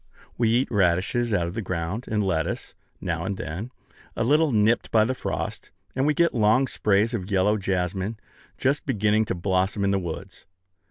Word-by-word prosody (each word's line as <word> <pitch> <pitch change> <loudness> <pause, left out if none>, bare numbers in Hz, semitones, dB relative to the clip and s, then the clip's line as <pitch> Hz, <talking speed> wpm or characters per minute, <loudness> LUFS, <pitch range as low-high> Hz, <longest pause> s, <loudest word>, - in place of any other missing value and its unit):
We 115 -2 +2
eat 120 +4 +2
radishes 100 +4 +1
out 90 -5 +1
of 85 - -5
the 115 - -3
ground, 95 +4 -3
and 105 -1 0
lettuce, 85 -5 -2 0.3
now 85 -3 -2
and 95 +1 -3
then, 90 - -5 0.5
a - - 0
little 150 +5 +3
nipped 110 +1 +2
by 110 -1 +4
the 130 - 0
frost; - - -4 0.3
and 135 +2 +1
we 150 - +2
get 170 +2 +3
long 115 +3 +3
sprays 105 -1 +1
of 100 -4 -3
yellow 100 +1 +3
jessamine, 95 +1 -2 0.4
just 140 +3 0
beginning 110 +1 +2
to - - -2
blossom 95 +2 0
in 100 - +2
the 100 - +2
woods. 95 +2 -7
105 Hz, 180 wpm, -25 LUFS, 95-115 Hz, 0.5 s, by